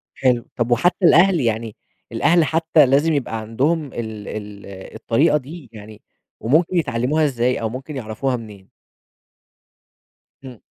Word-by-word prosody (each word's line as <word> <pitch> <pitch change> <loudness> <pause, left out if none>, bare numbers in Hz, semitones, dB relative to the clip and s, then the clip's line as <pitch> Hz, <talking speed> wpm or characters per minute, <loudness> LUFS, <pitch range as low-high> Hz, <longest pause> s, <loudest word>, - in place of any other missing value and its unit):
حلو، 125 -3 +1
طَب 120 0 -2
وحتى 175 - +2
الأهل، 175 +2 +5
يعني 115 -3 -2 0.4
الأهل 170 -1 +3
حتى 160 0 +3
لازم 145 +5 +2
يبقى 125 -6 -2
عندهم 140 +9 -1
ال 110 -3 -6
ال 105 -1 -8 0.3
الطريقة 140 +7 +2
دي؟ 145 0 -10
يعني 105 0 -12 0.4
وممكن 160 +9 +1
يتعلّموها 150 +1 0
إزاي 125 -3 -1
أو 110 - -2
ممكن 130 +5 -8
يعرَفوها 125 +2 -3
منين؟ 105 -5 -11 1.8
إمم. 125 -4 -11
125 Hz, 130 wpm, -20 LUFS, 110-155 Hz, 1.8 s, الأهل